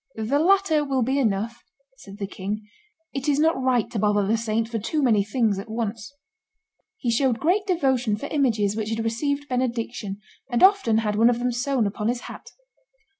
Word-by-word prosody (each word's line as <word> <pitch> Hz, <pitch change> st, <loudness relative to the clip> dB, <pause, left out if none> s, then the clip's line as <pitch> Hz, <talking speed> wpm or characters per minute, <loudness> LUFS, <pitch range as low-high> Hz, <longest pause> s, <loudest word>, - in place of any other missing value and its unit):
"The 225 Hz, +6 st, 0 dB
latter 345 Hz, -3 st, +3 dB
will 270 Hz, -3 st, 0 dB
be 265 Hz, +4 st, 0 dB
enough," 225 Hz, -1 st, -1 dB, 0.4 s
said 200 Hz, -, -12 dB
the 200 Hz, -, -3 dB
king; 205 Hz, +2 st, -5 dB, 0.5 s
"it 275 Hz, +1 st, -2 dB
is 280 Hz, -, +2 dB
not 315 Hz, -2 st, +2 dB
right 255 Hz, -3 st, +2 dB
to 220 Hz, -, -2 dB
bother 205 Hz, 0 st, +2 dB
the 215 Hz, +3 st, +2 dB
saint 225 Hz, 0 st, -1 dB
for 230 Hz, -1 st, -3 dB
too 295 Hz, +8 st, -1 dB
many 220 Hz, -6 st, +3 dB
things 210 Hz, -1 st, 0 dB
at 210 Hz, +3 st, -8 dB
once." 225 Hz, +1 st, -4 dB, 0.9 s
He 245 Hz, -9 st, -1 dB
showed 245 Hz, 0 st, +2 dB
great 390 Hz, +6 st, +1 dB
devotion 265 Hz, -, +1 dB
for 250 Hz, -, -6 dB
images 225 Hz, -9 st, +1 dB
which 220 Hz, -1 st, -3 dB
had 225 Hz, 0 st, -2 dB
received 285 Hz, +6 st, -2 dB
benediction, 235 Hz, -5 st, -2 dB, 0.3 s
and 240 Hz, +3 st, +1 dB
often 380 Hz, -, +5 dB
had 210 Hz, -2 st, 0 dB
one 230 Hz, +2 st, +5 dB
of 240 Hz, -, +1 dB
them 245 Hz, +1 st, -1 dB
sewn 245 Hz, 0 st, 0 dB
upon 210 Hz, +1 st, -2 dB
his 240 Hz, +1 st, -1 dB
hat. -, -, -10 dB
235 Hz, 190 wpm, -24 LUFS, 215-275 Hz, 0.9 s, often